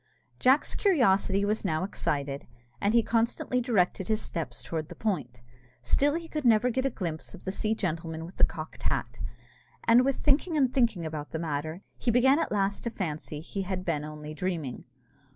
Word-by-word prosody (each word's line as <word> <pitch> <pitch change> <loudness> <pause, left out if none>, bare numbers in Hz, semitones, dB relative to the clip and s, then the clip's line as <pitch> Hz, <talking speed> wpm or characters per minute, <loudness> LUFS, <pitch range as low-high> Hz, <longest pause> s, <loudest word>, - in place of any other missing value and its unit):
Jack's 265 +3 +4
curiosity 200 - +3
was 210 +2 0
now 160 -3 0
excited, 140 -7 -2 0.3
and 205 +3 +2
he 235 - +6
constantly 235 +2 +1
directed 190 -6 +1
his 215 -1 +2
steps 140 - -4
towards 160 -2 -3
the - - -10
point; 125 - -2 0.4
still 285 - +3
he 335 0 -4
could 305 -2 -3
never 235 0 +4
get 260 +3 +1
a - - +1
glimpse 170 -9 -4
of - - -14
the 190 - -1
sea 215 +3 0
gentleman 165 -4 -3
with 175 - -12
the - - +2
cocked 155 -1 -1
hat; 120 -3 -3 0.6
and 235 +2 +6
with 275 0 +2
thinking 305 +3 +2
and 260 -3 +3
thinking 225 -10 +2
about 155 -1 -5
the - - -3
matter, 155 +2 -3 0.2
he 240 - 0
began 260 +5 +5
at - - -1
last 200 -1 0
to 235 - -2
fancy 155 -7 -4
he 195 +4 -4
had 185 -1 -3
been 150 -4 0
only 150 0 -7
dreaming. 160 -6 -3
190 Hz, 190 wpm, -29 LUFS, 155-235 Hz, 0.6 s, he